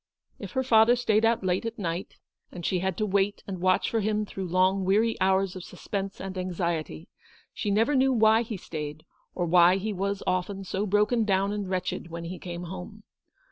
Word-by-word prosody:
If - - -8
her 260 -1 0
father 235 -1 +5
stayed 225 -3 +2
out 230 -1 +2
late 185 0 0
at 230 +1 -5
night, 175 -2 -4 0.4
and 175 -2 -7
she 185 - +1
had 190 0 -2
to 215 - 0
wait 200 0 0
and 185 -3 -6
watch 185 0 +2
for 225 - 0
him 215 0 0
through 190 -2 -6
long 185 +2 +2
weary 215 +5 +2
hours 190 0 +2
of 185 - -7
suspense 195 +1 -5
and 190 -1 -5
anxiety, 170 - -3 0.5
she 210 - -3
never 225 +7 +2
knew 265 0 +3
why 220 -2 +4
he 225 -3 -5
stayed, 155 -2 -7 0.3
or 175 - 0
why 175 +1 +6
he 210 +2 -3
was 200 +1 -2
often 190 +2 -1
so 195 +2 -2
broken 210 +4 +2
down 195 -1 +1
and 205 -2 -4
wretched 180 -2 -3
when 170 0 -6
he 175 +2 -6
came 175 -1 -6
home. 190 +4 -8
195 Hz, 200 wpm, -27 LUFS, 180-215 Hz, 0.5 s, why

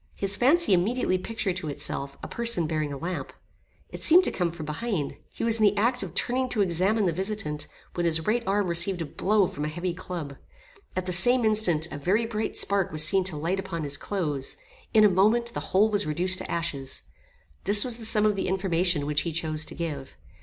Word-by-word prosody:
His 195 0 +3
fancy 285 - +3
immediately 185 +1 +1
pictured 195 -2 -3
to 180 -4 -4
itself, 140 -1 -5
a - - -4
person 235 -7 +1
bearing 155 -2 -2
a 140 - -5
lamp. 175 +5 -5 0.6
It - - -9
seemed 350 +3 +7
to - - 0
come 175 -2 -1
from 165 -2 -8
behind. 155 -1 -3 0.2
He - - -6
was 230 -1 +3
in - - +2
the 205 0 +4
act 240 +4 +1
of 185 -3 -7
turning 255 +3 0
to 215 -4 +1
examine 195 +4 +1
the 175 - +2
visitant, 190 -5 -3 0.3
when 175 -1 0
his 165 -1 +1
right 230 +2 +1
arm 200 +1 +1
received 175 +1 0
a - - -5
blow 200 +7 +1
from 150 -4 -5
a - - -1
heavy 175 +3 -3
club. 170 -6 -6 0.6
At 185 0 -2
the 180 - -2
same 245 +7 +5
instant, 185 -8 +2
a 145 - -6
very 200 +10 +1
bright 220 -1 -3
spark 200 -2 +1
was 155 0 +3
seen 190 +3 +3
to 180 -5 0
light 170 +6 -1
upon 180 -4 -4
his 145 -1 -2
clothes. 150 -6 -3 0.3
In 220 -2 +5
a - - +8
moment, 220 +5 +2
the - - -3
whole 210 +3 +3
was 205 -3 +1
reduced 180 +5 0
to - - -7
ashes. 140 -6 -3 0.6
This 205 +2 +4
was 240 -2 0
the 225 - -4
sum 215 -1 +3
of 210 -1 +2
the 195 - -2
information 180 -4 +1
which 150 0 0
he 170 - -3
chose 160 -1 -1
to - - -8
give. 145 -5 -5
185 Hz, 220 wpm, -26 LUFS, 160-215 Hz, 0.6 s, a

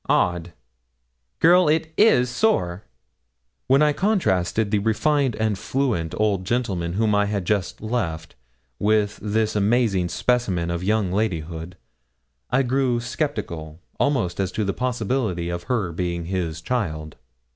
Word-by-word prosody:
Odd! 85 0 +1 0.9
girl, 175 0 +5
it 160 +1 0
is 200 - +5
sore.' 120 - 0 0.8
When 135 +3 +5
I 150 -1 +3
contrasted 110 - +1
the 105 - +3
refined 130 +4 +1
and 110 -3 -1
fluent 120 -12 -1
old 105 -3 +1
gentleman 95 -6 -1
whom 105 +2 +1
I 105 0 +3
had 100 -3 -2
just 100 0 -1
left, 95 -9 -3 0.5
with 105 0 +1
this 110 +1 0
amazing 105 -4 +2
specimen 95 -10 0
of 85 +1 -3
young 105 -2 +1
ladyhood, 90 -4 -3 0.7
I 135 +2 +2
grew 130 -1 +1
sceptical 100 - -4 0.2
almost 115 -12 0
as 95 -2 0
to 110 - -1
the 100 - -1
possibility 115 -7 -1
of 85 0 -4
her 110 -9 -1
being 85 0 -3
his 85 -3 -3
child. 80 -11 -3
105 Hz, 135 wpm, -23 LUFS, 90-125 Hz, 0.9 s, girl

